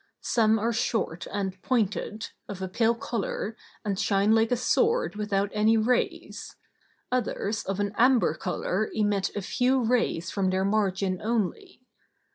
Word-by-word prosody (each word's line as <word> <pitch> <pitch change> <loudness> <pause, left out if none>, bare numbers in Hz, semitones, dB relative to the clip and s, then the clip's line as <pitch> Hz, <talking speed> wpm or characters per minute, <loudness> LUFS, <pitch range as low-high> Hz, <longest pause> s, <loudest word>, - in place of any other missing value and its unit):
Some 220 -2 +3
are 230 +2 0
short 215 -7 -1
and 190 -2 -3
pointed, 215 -2 -1 0.2
of 200 - -6
a 190 - -3
pale 225 +5 +2
color, 225 -1 -3 0.3
and 200 -2 -1
shine 200 +1 +3
like 225 +1 +3
a 245 - +3
sword 455 - +1
without 205 -1 -1
any 215 +1 +3
rays; 240 +3 -1 0.6
others 220 -4 -1
of 195 0 -3
an 205 0 -1
amber 250 +1 +4
color - - -2
emit 205 -3 +1
a 205 - -3
few 255 +5 +1
rays 225 -8 0
from 195 -2 0
their 190 +1 +1
margin 195 -2 0
only. 235 - -2
215 Hz, 145 wpm, -27 LUFS, 195-235 Hz, 0.6 s, amber